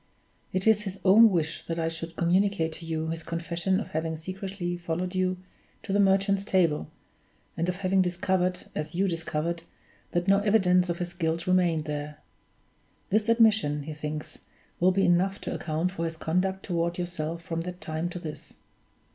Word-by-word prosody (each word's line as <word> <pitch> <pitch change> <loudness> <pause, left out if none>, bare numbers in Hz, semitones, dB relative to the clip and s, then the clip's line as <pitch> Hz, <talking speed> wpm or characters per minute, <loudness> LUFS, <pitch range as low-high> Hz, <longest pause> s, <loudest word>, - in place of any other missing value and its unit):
It 185 0 0
is 220 -2 +5
his 195 -2 -6
own 220 +4 +8
wish 165 -4 -1
that 165 - -2
I 165 -1 0
should 165 0 -5
communicate 175 -1 +2
to 165 +1 -9
you 160 0 -2
his 165 0 -2
confession 170 +3 -1
of - - -5
having 160 +1 -2
secretly 185 +1 -4
followed 175 +1 -3
you 185 0 0 0.5
to 195 - -3
the 200 - +3
Merchant's 195 0 +3
Table, 170 - +1 0.7
and 170 +2 -1
of 180 - -1
having 190 0 +2
discovered 180 0 0
(as 155 +2 -4
you 195 +2 +2
discovered) 165 -1 -2 0.5
that 175 +1 0
no 195 0 +5
evidence 185 -4 +3
of 170 - -1
his 175 0 -4
guilt 165 -1 -1
remained 175 -4 +2
there. 150 0 -4 0.9
This 215 +2 +2
admission, 220 -11 +4
he 155 +2 -6
thinks, 150 0 -6 0.4
will 185 +2 +5
be 195 +1 +2
enough 185 +3 +2
to - - -3
account 165 +3 -1
for 170 -3 -3
his 165 0 -3
conduct 185 +4 0
toward 170 -1 -1
yourself 170 -2 -4
from 165 0 -3
that 180 +1 -6
time 160 +1 -3
to 180 - -6
this. 160 -3 -8
175 Hz, 175 wpm, -27 LUFS, 165-190 Hz, 0.9 s, own